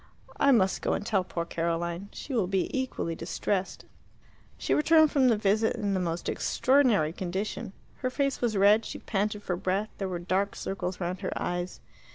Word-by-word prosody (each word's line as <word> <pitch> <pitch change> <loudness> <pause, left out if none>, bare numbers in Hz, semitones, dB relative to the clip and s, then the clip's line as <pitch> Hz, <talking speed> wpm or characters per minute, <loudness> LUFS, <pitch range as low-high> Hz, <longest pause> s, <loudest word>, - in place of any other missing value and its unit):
I 280 - +4
must 195 -7 +3
go - - 0
and - - -2
tell 205 -5 +1
poor 170 -2 -4
Caroline. 170 +3 -2
She 280 - -7
will 215 -7 +1
be 190 +5 -1
equally 260 -10 -2
distressed." 185 +3 -3 0.7
She - - 0
returned 315 0 +5
from 270 -3 +4
the 230 -3 +4
visit 210 +2 +2
in 205 -4 -1
the 190 - +1
most 170 -1 -2
extraordinary 250 - +2
condition. 190 +5 -4 0.3
Her 255 - -1
face 275 +1 -1
was 230 -4 +1
red, 205 +3 +5
she - - -6
panted 210 0 -2
for 180 - -1
breath, 195 +4 -1
there 195 -1 -2
were 180 - -2
dark 185 +3 -1
circles 185 -1 -4
round 180 +1 -3
her - - -3
eyes. 175 +1 -3
195 Hz, 185 wpm, -28 LUFS, 180-230 Hz, 0.7 s, returned